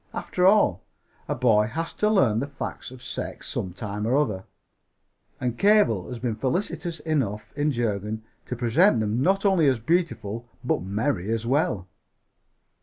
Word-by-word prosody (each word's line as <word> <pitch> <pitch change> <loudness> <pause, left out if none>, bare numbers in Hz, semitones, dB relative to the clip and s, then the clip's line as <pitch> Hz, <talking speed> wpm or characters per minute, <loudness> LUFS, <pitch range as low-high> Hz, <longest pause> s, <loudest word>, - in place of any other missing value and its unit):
After 180 0 +1
all, 190 - +4 0.5
a - - -1
boy 110 -4 +3
has 165 +7 -4
to 210 - +1
learn 130 - +3
the 140 - -2
facts 140 - -6
of 130 0 -12
sex - - -5
some 90 - -3
time 105 +2 -4
or 130 +4 +3
other, 105 -10 0 0.9
and 120 -1 -2
Cabell 130 - +4
has 125 - -5
been 120 -1 -2
felicitious 165 - -2
enough 130 -10 -2
in 145 +1 +1
Jurgen 110 -3 -2 0.2
to 125 - -3
present 125 - +3
them 110 +3 0
not 195 +6 +2
only 185 -6 +4
as 130 -2 +3
beautiful, 115 - -1 0.2
but - - 0
merry 100 +1 -1
as 115 0 -1
well. 120 - 0
120 Hz, 160 wpm, -25 LUFS, 105-160 Hz, 0.9 s, all